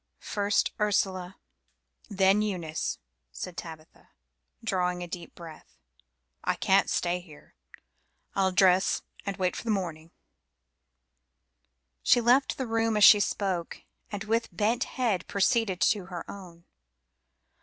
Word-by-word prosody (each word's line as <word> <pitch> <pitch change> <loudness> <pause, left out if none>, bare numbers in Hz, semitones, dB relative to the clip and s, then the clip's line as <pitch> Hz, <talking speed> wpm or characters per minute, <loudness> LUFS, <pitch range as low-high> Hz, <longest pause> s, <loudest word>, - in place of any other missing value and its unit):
"First 205 0 0
Ursula, 190 -3 0 0.7
then 195 0 +3
Eunice," 175 -7 -3 0.3
said 180 - -7
Tabitha, 160 -2 -10 0.5
drawing 180 -4 -1
a - - -6
deep 175 -1 -8
breath. 165 -3 -12 0.7
"I - - 0
can't - - +2
stay 175 0 0
here. 165 -4 -16 0.8
I'll 190 -1 +2
dress 185 0 +3 0.2
and 195 - -3
wait 185 -1 0
for - - -6
the 230 - -5
morning." 170 -6 -2 1.9
She - - +4
left 245 +4 +3
the 260 - -2
room 225 -1 0
as 210 - +4
she 210 - +9
spoke, 190 -4 -2 0.3
and 205 -1 -4
with 225 +2 0
bent 215 +7 0
head 230 -8 -1
proceeded 200 -1 +1
to 200 -4 +2
her 175 -3 -6
own. 175 -4 -11
190 Hz, 125 wpm, -28 LUFS, 175-210 Hz, 1.9 s, she